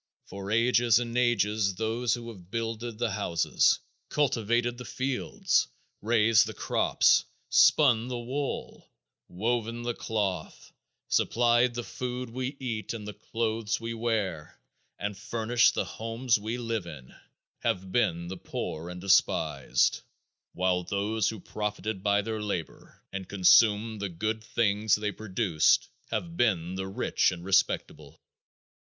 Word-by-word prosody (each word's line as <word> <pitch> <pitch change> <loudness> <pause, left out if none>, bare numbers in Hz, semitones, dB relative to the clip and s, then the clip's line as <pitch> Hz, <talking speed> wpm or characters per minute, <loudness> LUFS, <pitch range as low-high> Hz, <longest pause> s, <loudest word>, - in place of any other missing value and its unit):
For 100 0 -8
ages 115 0 +4
and 120 -1 -2
ages 105 -5 +2
those 115 +3 0
who 120 -1 -8
have 95 -6 -12
builded 115 0 -4
the 120 -1 -1
houses, 100 -5 +2 0.3
cultivated 120 -3 0
the - - -6
fields, 130 +1 0 0.3
raised 115 -1 +4
the - - -7
crops, - - +3 0.3
spun 125 -6 +5
the 125 -1 -3
wool, 130 +4 -4 0.4
woven 115 +4 -2
the 120 0 -1
cloth, 100 -8 -3 0.4
supplied 120 +1 +2
the 120 - -3
food 125 -1 -5
we 130 +3 -4
eat 115 -4 -4
and 105 -2 -7
the 105 - -5
clothes 110 0 -2
we 115 0 -4
wear, 110 -9 -2 0.4
and 100 0 -3
furnished 115 +3 +2
the - - 0
homes 115 +1 -1
we 110 +3 -3
live 115 -6 -3
in, 70 -6 -10 0.5
have 95 0 -2
been 85 -7 +1
the 95 +1 -6
poor 85 -1 -5
and 90 0 -7
despised, 95 0 +2 0.5
while 90 0 +1
those 100 +3 -1
who 110 - -6
profited 105 +1 -4
by 100 0 +2
their 110 0 -3
labor 100 -6 -6
and 95 -1 -5
consumed 105 +3 +4
the 100 - -2
good 110 +6 -3
things 105 -1 +2
they 105 0 -2
produced, 100 -6 +1 0.2
have 170 -1 -3
been 95 - +1
the 95 0 -4
rich 95 - +1
and 90 -1 -7
respectable. 95 0 0
110 Hz, 135 wpm, -28 LUFS, 100-120 Hz, 0.5 s, spun